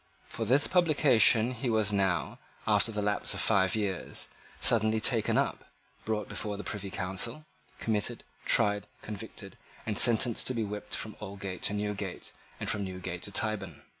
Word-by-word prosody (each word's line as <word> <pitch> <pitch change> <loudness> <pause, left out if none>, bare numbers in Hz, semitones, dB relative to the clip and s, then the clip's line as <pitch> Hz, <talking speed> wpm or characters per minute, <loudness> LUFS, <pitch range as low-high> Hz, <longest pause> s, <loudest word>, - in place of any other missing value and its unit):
For 115 - -4
this 135 +6 +4
publication 140 - +4
he 125 0 -3
was 110 -2 +2
now, 95 -3 0 0.3
after - - +4
the 105 -1 -2
lapse 105 0 +1
of - - -2
five 100 -1 +2
years, 100 -4 -4 0.3
suddenly 110 -2 +3
taken 110 -1 +2
up, - - 0 0.4
brought 110 -2 -1
before 105 -1 -4
the 105 - -6
Privy 100 -1 -5
Council, 95 +10 -3 0.3
committed, 105 -2 -1 0.2
tried, 105 0 +2 0.2
convicted, 105 -2 -8 0.3
and 105 -2 0
sentenced 120 0 +4
to 130 - 0
be 115 - 0
whipped 105 0 -3
from 110 - -6
Aldgate 100 -2 -6
to - - +2
Newgate 105 -2 -4 0.3
and - - -4
from 100 - -1
Newgate 90 -2 -5
to 100 - -5
Tyburn. 110 -2 -1
105 Hz, 160 wpm, -30 LUFS, 100-115 Hz, 0.4 s, this